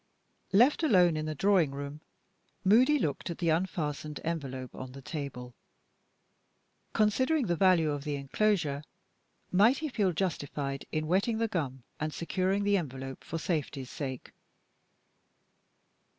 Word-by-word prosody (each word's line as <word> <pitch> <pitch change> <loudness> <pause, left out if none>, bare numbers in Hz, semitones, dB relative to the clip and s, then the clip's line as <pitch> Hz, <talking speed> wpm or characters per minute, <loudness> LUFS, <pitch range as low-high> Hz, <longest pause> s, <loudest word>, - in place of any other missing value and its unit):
LEFT 245 +12 +5
alone 180 - +5
in 155 0 -2
the 155 - -3
drawing 190 -2 +3
room, 140 +2 -6 0.6
Moody 245 +9 +5
looked 155 - -2
at 170 - -4
the 170 -2 0
unfastened 155 -3 -1
envelope 135 -6 -4
on 130 0 -8
the 135 - -9
table. 130 -6 -6 1.4
Considering 260 +7 +2
the 175 -3 +1
value 170 -4 +4
of 145 -1 -3
the 150 -1 -2
inclosure, 145 0 0 0.7
might 215 +8 +5
he 310 -1 -3
feel 205 -7 +1
justified 145 -5 -3
in 155 0 -1
wetting 195 +7 +1
the 230 0 +1
gum 140 - -3 0.2
and 155 0 -3
securing 190 +3 0
the 205 0 +3
envelope 135 -5 -5
for 165 - -4
safety's 150 -6 -3
sake? 130 -4 -5
165 Hz, 135 wpm, -30 LUFS, 140-195 Hz, 1.4 s, LEFT